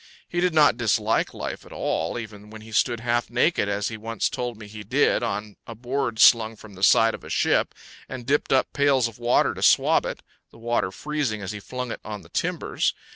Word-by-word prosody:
He 175 Hz, -, -3 dB
did 180 Hz, -2 st, +1 dB
not 150 Hz, -1 st, +5 dB
dislike 110 Hz, -1 st, +1 dB
life -, -, -6 dB
at -, -, -16 dB
all, 80 Hz, +8 st, -2 dB
even 105 Hz, -3 st, -9 dB
when 110 Hz, 0 st, -11 dB
he 110 Hz, +1 st, -13 dB
stood 115 Hz, +1 st, +1 dB
half 120 Hz, 0 st, 0 dB
naked, 120 Hz, -2 st, +1 dB
as 100 Hz, 0 st, -1 dB
he 115 Hz, -, -6 dB
once 115 Hz, +1 st, -2 dB
told 120 Hz, -2 st, -4 dB
me 110 Hz, -, -10 dB
he 105 Hz, +1 st, -10 dB
did, 130 Hz, +8 st, +2 dB
on 105 Hz, -3 st, -4 dB
a 115 Hz, -, -8 dB
board 125 Hz, 0 st, -3 dB
slung 115 Hz, -1 st, +5 dB
from 105 Hz, -1 st, -14 dB
the 95 Hz, -, -13 dB
side 115 Hz, +3 st, +5 dB
of -, -, -8 dB
a -, -, -10 dB
ship, -, -, +1 dB, 0.3 s
and 130 Hz, -2 st, -7 dB
dipped 145 Hz, +3 st, 0 dB
up 130 Hz, -1 st, +2 dB
pails 140 Hz, -4 st, +3 dB
of 115 Hz, 0 st, -12 dB
water 120 Hz, +1 st, +2 dB
to -, -, -9 dB
swab -, -, +4 dB
it, -, -, -6 dB, 0.3 s
the -, -, -18 dB
water 115 Hz, -4 st, -1 dB
freezing 135 Hz, -3 st, -3 dB
as 95 Hz, -, -4 dB
he 105 Hz, -, -6 dB
flung 125 Hz, +4 st, -6 dB
it -, -, -6 dB
on 105 Hz, -2 st, -7 dB
the -, -, -17 dB
timbers. -, -, -1 dB
115 Hz, 225 wpm, -24 LUFS, 105-125 Hz, 0.3 s, not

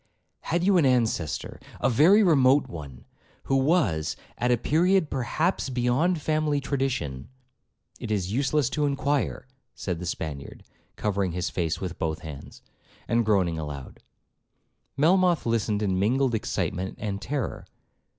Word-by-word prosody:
'Had 170 Hz, +1 st, -1 dB
you 195 Hz, 0 st, +4 dB
an 165 Hz, -, +4 dB
ancestor, 115 Hz, -, 0 dB, 0.2 s
a -, -, +2 dB
very 165 Hz, -, +5 dB
remote 140 Hz, -5 st, +4 dB
one, 70 Hz, -7 st, -9 dB, 0.4 s
who 135 Hz, -, 0 dB
was—at 120 Hz, -, 0 dB
a 120 Hz, -, +4 dB
period 170 Hz, -, +2 dB
perhaps 135 Hz, +6 st, -1 dB
beyond 130 Hz, +8 st, +1 dB
family 155 Hz, -1 st, 0 dB
tradition—It 125 Hz, -, -5 dB
is 100 Hz, -3 st, -1 dB
useless 140 Hz, +2 st, +1 dB
to 150 Hz, -1 st, +1 dB
inquire,' 140 Hz, 0 st, -1 dB, 0.3 s
said 90 Hz, -3 st, -4 dB
the 90 Hz, -, -5 dB
Spaniard, 75 Hz, -4 st, -5 dB, 0.3 s
covering 100 Hz, -4 st, -1 dB
his 90 Hz, +1 st, -2 dB
face 85 Hz, -3 st, -1 dB
with 90 Hz, -2 st, -5 dB
both 80 Hz, -1 st, -2 dB
his 80 Hz, -, -7 dB
hands, 70 Hz, 0 st, -12 dB, 0.5 s
and 115 Hz, 0 st, +2 dB
groaning 95 Hz, -7 st, +1 dB
aloud. 75 Hz, -3 st, -7 dB, 1.0 s
Melmoth 175 Hz, +3 st, +3 dB
listened 110 Hz, -2 st, 0 dB
in 95 Hz, -2 st, 0 dB
mingled 125 Hz, +5 st, +2 dB
excitement 95 Hz, -3 st, -2 dB
and 100 Hz, -2 st, -4 dB
terror. 135 Hz, +3 st, -4 dB
120 Hz, 130 wpm, -26 LUFS, 90-145 Hz, 1.0 s, very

